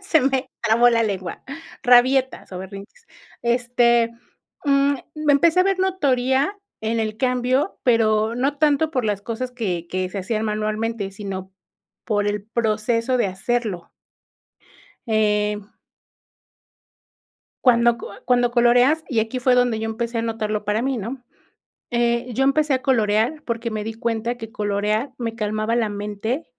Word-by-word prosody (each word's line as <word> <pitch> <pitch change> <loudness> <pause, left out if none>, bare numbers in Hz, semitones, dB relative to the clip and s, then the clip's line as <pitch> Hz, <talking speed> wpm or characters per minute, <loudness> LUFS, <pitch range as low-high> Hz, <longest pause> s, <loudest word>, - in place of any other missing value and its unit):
Se 385 -5 +2
me 265 0 0
trabó 235 +2 +5
la 230 -1 +2
lengua, 190 -5 -4 0.4
rabietas 255 +1 +4
o 180 - -5
berrinches. 200 - -10 0.4
Este, 240 -1 +2 0.5
mm, 280 0 +3 0.2
me 305 -1 +2
empecé 330 +5 +4
a - - +6
ver 390 0 +1
notoria 280 -3 +1 0.2
en 225 +1 -1
el 215 -1 -2
cambio, 255 - 0
pero 220 -2 +3
no 275 +4 -1
tanto 305 +1 +2
por 255 -5 -1
las 205 -2 -1
cosas 245 +3 -4
que, 185 -9 -3
que 185 +1 -2
se 200 - -5
hacían 215 +3 -2
manualmente, 215 0 -2
sino 195 -2 -6 0.5
por 205 -2 0
el 205 -1 -2
proceso 230 +2 0
de 240 - +2
hacerlo. 195 -1 -3 1.2
Em. 210 -1 +1 2.0
Cuando 235 -2 +5 0.3
cuando 245 -1 +3
co - - -20
coloreas, 245 +6 +4
y 235 -5 +1
aquí 225 +4 -2
fue 250 0 +3
donde 245 -3 +2
yo 225 - -2
empecé 230 +1 -3
a - - 0
notarlo 215 -2 -2
para 210 +2 0
mí, 265 0 0
¿no? 245 +4 -5 0.7
Eh, 235 +1 0
yo 265 +4 +1
empecé 295 +1 +2
a 260 - 0
colorear 230 +3 +1
porque 235 0 -2
me 215 -1 -3
di 225 +1 -4
cuenta 230 +1 -2
que 225 -1 -8
colorear 210 +4 -1
me 230 -2 -4
calmaba 215 +1 -1
la 230 -3 +1
mente, 210 +8 -3
235 Hz, 150 wpm, -22 LUFS, 215-255 Hz, 2.0 s, a